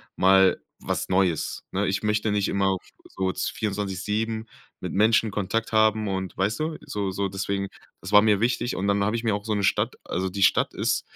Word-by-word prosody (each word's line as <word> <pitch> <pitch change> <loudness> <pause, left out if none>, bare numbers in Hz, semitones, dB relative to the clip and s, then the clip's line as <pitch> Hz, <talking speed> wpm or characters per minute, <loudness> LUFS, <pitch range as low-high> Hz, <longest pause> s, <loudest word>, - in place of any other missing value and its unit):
mal 95 0 +5 0.2
was - - -3
Neues, 90 -4 0
ne? 100 +2 0
Ich 95 - -1
möchte 105 0 +1
nicht 100 -2 +1
immer 100 0 +1
auf 95 -1 -1 0.2
so 95 0 -2
24/7 105 +2 -2 0.3
mit - - -5
Menschen 110 +2 +3
Kontakt 110 +4 -2
haben 110 -1 +3
und 95 -1 -3
weißt 100 +8 0
du? 155 0 -2
So 100 -2 -3
so 100 +1 -2
deswegen, 100 0 -2 0.3
das 95 - -7
war 105 0 +8
mir 105 -2 +3
wichtig 120 0 0
und 100 +2 -2
dann 100 0 +2
habe 105 +3 0
ich 115 - -3
mir 110 -3 +1
auch 100 +1 -6
so 110 - -1
'ne 100 -1 -1
Stadt - - +1
also 95 +1 -2
die 100 +1 -1
Stadt - - +3
ist - - 0
100 Hz, 205 wpm, -25 LUFS, 95-110 Hz, 0.3 s, war